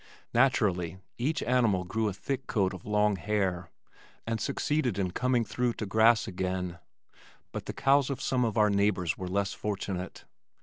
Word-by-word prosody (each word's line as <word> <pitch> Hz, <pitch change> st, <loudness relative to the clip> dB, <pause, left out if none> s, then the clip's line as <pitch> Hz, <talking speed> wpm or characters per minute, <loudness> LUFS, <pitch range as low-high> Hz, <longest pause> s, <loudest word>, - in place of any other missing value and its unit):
Naturally 100 Hz, -9 st, +2 dB, 0.2 s
each 150 Hz, +6 st, 0 dB
animal 115 Hz, -6 st, +2 dB
grew 110 Hz, +5 st, -1 dB
a 100 Hz, -, -1 dB
thick 135 Hz, +7 st, -4 dB
coat 100 Hz, -3 st, +1 dB
of 95 Hz, +1 st, -10 dB
long 105 Hz, -1 st, +2 dB
hair, 95 Hz, -3 st, -1 dB, 0.6 s
and 115 Hz, -2 st, -2 dB
succeeded 145 Hz, -5 st, 0 dB
in 95 Hz, -3 st, 0 dB
coming 125 Hz, +2 st, +1 dB
through 125 Hz, +2 st, -1 dB
to 110 Hz, -, -5 dB
grass 110 Hz, +3 st, +4 dB
again, 90 Hz, -2 st, -3 dB, 0.7 s
but -, -, -6 dB
the -, -, -3 dB
cows 140 Hz, 0 st, +3 dB
of 135 Hz, -2 st, -3 dB
some 130 Hz, -2 st, +1 dB
of 115 Hz, -2 st, -1 dB
our 105 Hz, -1 st, +4 dB
neighbors 100 Hz, -4 st, +1 dB
were 90 Hz, -, -5 dB
less 95 Hz, +1 st, -1 dB
fortunate. 95 Hz, -3 st, -4 dB
105 Hz, 165 wpm, -29 LUFS, 95-120 Hz, 0.7 s, grass